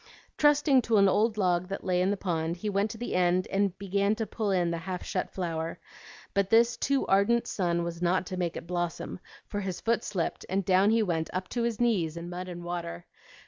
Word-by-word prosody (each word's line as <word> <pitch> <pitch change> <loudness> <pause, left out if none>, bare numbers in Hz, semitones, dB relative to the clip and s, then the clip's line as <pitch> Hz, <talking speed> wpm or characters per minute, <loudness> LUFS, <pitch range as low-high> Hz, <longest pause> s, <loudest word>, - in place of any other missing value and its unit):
Trusting 295 -2 +4
to 225 -2 +2
an 200 -1 +6
old 215 +3 +2
log 180 -2 +1
that 195 +1 -5
lay 180 -1 +1
in 185 - +2
the 205 - 0
pond, 170 -3 -2
he 210 +4 -3
went 200 +2 +1
to 220 - -7
the 240 - -4
end 180 0 +2
and 195 -2 +1
bent 200 +2 0
to 225 - -1
pull 215 -1 -3
in 180 -3 +2
the 170 - -2
half 180 +1 -5
shut 185 - -2
flower; 165 -3 -3 0.6
but 200 -1 +1
this 230 +1 +5
too 275 -1 0
ardent 200 +5 +3
sun 170 -3 0
was 170 0 -5
not 180 +1 +2
to 185 - -5
make 175 -2 -2
it - - -7
blossom, 175 0 -3 0.3
for 205 - -4
his 190 -3 -4
foot 230 0 0
slipped 175 -5 -2
and 190 0 0
down 190 +2 +4
he 225 0 +3
went 165 -5 -1
up 185 0 -3
to 240 - -2
his 235 -2 -1
knees 185 -10 +1
in 170 +1 -6
mud 180 +1 -5
and 175 -1 -7
water. 170 - -5
185 Hz, 225 wpm, -28 LUFS, 175-210 Hz, 0.6 s, an